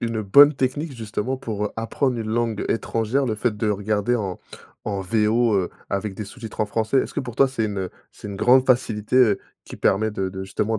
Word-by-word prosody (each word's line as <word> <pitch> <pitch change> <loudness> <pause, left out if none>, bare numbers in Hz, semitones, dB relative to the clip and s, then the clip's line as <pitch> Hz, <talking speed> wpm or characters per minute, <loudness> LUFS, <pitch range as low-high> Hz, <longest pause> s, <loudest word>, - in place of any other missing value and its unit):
une 115 -2 -2
bonne 145 +9 +7
technique 135 +4 -2
justement 115 +3 -3
pour, 105 -4 -4
heu, 105 - -2
apprendre 120 +3 -1
une 110 - -4
langue 115 -2 -1
étrangère, 115 +4 0
le 110 - 0
fait 110 0 -1
de 105 +1 -1
regarder 105 +3 0
en 100 -6 -3 0.5
en 100 -2 -2
VO, 110 +3 +2
heu, 90 -2 0 0.2
avec 100 0 -2
des 105 - -5
sous-titres 110 +1 -8
en 110 - +2
français? 110 +4 0
Est-ce - - -2
que - - -1
pour 125 -4 -7
toi, 135 +2 +4
c'est 130 -4 -2
une 100 -3 -3 0.2
c'est - - -10
une 100 - -6
grande 125 +5 +5
facilité, 120 -3 +1
heu, 115 -6 +5 0.2
qui - - -10
permet 110 +3 +2
de 95 -2 -2
de 95 0 -6
justement 105 +3 -1
110 Hz, 215 wpm, -23 LUFS, 105-120 Hz, 0.5 s, bonne